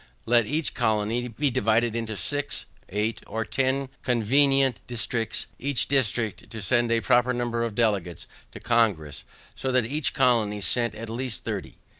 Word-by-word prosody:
Let 120 -2 +4
each 155 +1 -1
colony 110 +1 0
be 135 +4 -1
divided 115 -1 +2
into 110 -2 -3
six, 145 - -1 0.2
eight, 105 +3 -1
or 110 0 -3
ten, 135 +4 0
convenient 135 +2 +3
districts, 115 -2 -2
each 140 -1 0
district 120 -5 0
to 110 -2 -7
send 120 +1 +2
a 115 0 +2
proper 125 +2 +3
number 120 -1 -1
of 115 -3 -3
delegates 100 -8 0 0.3
to - - -8
Congress, 105 - +1 0.3
so 130 - -3
that 125 -2 +2
each 145 +4 -1
colony 110 -4 +2
send 120 +3 -1
at 115 +2 -7
least 120 +1 -4
thirty. - - -5
115 Hz, 155 wpm, -26 LUFS, 110-130 Hz, 0.3 s, Let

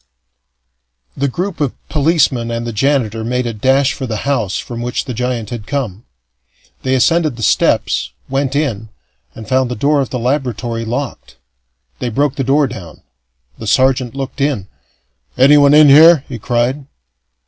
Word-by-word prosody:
The 140 - 0
group 175 +5 -4
of 140 -4 -1
policemen 145 -6 +1
and 115 0 -3
the 115 - -4
janitor 115 -3 0
made 125 +2 -1
a 120 - -3
dash 130 +5 +2
for 130 - -5
the 110 -3 -4
house 120 -9 -1
from 120 -1 -6
which 120 0 -3
the 130 - -5
giant 120 -2 -3
had 115 -3 -6
come. 120 -7 -4 0.8
They 130 0 0
ascended 155 +1 +2
the 115 - -7
steps, - - +1 0.2
went 135 0 -1
in, 115 -8 -2 0.5
and 110 - -10
found 130 -1 +1
the 125 - -3
door 145 +5 +1
of 135 - -3
the 125 - -3
laboratory 120 -3 -2
locked. 125 +4 -5 0.6
They 125 - -2
broke 140 +4 0
the 135 - -2
door 140 +3 +2
down. 110 -10 -9 0.6
The 110 - -7
sergeant 130 +1 +2
looked 135 +1 -5
in. 135 -9 -1 0.7
"Anyone 140 +2 +6
in 150 0 +7
here?" 155 +1 +7
he 125 -3 -7
cried. 125 +5 -1
130 Hz, 160 wpm, -16 LUFS, 115-140 Hz, 0.8 s, in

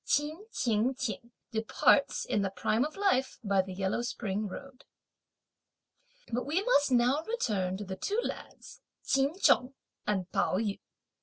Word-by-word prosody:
Ch'in 310 +8 -1
Ching 235 - +1
ch'ing 235 -2 -4 0.2
departs, 225 +5 +2
in 210 - 0
the 195 - 0
prime 205 +5 0
of 305 +4 -4
life, 370 -10 +1
by 200 -2 +3
the 190 0 -8
yellow 190 +4 -1
spring 215 -3 -2
road. 270 +6 -10 1.5
But 245 - 0
we 340 +7 +1
must 290 - +3
now 250 +4 +3
return 205 - -1
to 205 - -6
the 190 0 -6
two 415 - -1
lads, - - -7 0.2
Ch'in 275 +5 +1
Chung 255 -7 +4 0.3
and 190 -4 0
Pao - - +1
yü. 205 -1 -1
240 Hz, 150 wpm, -30 LUFS, 200-280 Hz, 1.5 s, Chung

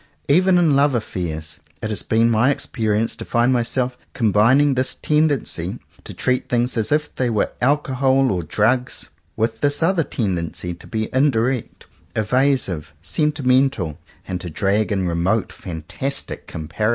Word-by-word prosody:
Even 180 +5 +4
in 165 -5 +4
love 140 -1 +3
affairs 80 -8 -4 0.2
it 110 - -4
has 100 -5 0
been 115 +1 +2
my 120 +5 +4
exper 115 -5 -2
ience 115 +1 -1
to - - -6
find 120 +2 +2
myself 125 +1 0 0.2
combining 120 +6 +4
this 130 0 0
tendency 150 -2 0 0.3
to - - -9
treat 125 -1 -1
things 120 +1 +1
as 110 +1 0
if 150 0 0
they 125 -2 0
were 110 -3 0
alcohol 135 -1 +2
or 90 -2 -1
drugs, 120 - 0 0.3
with 110 0 -1
this 145 +2 +1
other 170 -1 +3
tendency 90 - -3
to 85 - -13
be 110 -2 -2
in 135 +3 +4
direct, 120 0 -2 0.3
evasive, 110 - +1
sentimental; 130 - +1 0.3
and 90 -1 -4
to 90 - -6
drag 100 +7 0
in 95 -3 0
remote 90 +6 0
fantastic 90 - -5
comparisons. 80 +7 -2
120 Hz, 150 wpm, -21 LUFS, 100-135 Hz, 0.3 s, Even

